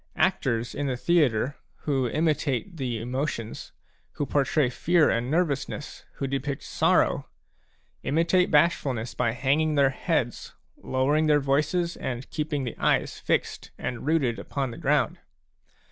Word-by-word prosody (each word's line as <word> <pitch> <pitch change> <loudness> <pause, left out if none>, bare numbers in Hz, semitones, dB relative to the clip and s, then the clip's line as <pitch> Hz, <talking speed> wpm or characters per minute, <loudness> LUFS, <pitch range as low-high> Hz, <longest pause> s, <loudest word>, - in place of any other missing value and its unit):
Actors 115 +1 +1
in 145 - -2
the 130 -2 -1
theatre, 145 -4 +2 0.2
who 135 -4 0
imitate 155 - 0
the 125 -5 -2
emotions, 125 -1 -4 0.4
who 145 - -2
portray 140 +1 +2
fear 165 +6 +3
and 115 +2 -1
nervousness, 150 -3 -2
who 140 - -4
depict 135 +1 -3
sorrow, - - +2 0.7
imitate 170 +5 +2
bashful 150 -3 +3
ness 115 +1 -5
by 120 -2 0
hanging 145 +5 +1
their 140 -2 +4
heads, - - -2 0.2
lowering 145 +4 +1
their 150 -1 +5
voices, 150 +5 0
and 125 0 -5
keeping 150 -2 -2
their 120 - -3
eyes - - +1
fixed - - -1
and 125 +2 -5
rooted 135 -9 +1
upon 135 +5 -3
the - - -9
ground. 150 -2 +1
140 Hz, 135 wpm, -26 LUFS, 125-155 Hz, 0.7 s, their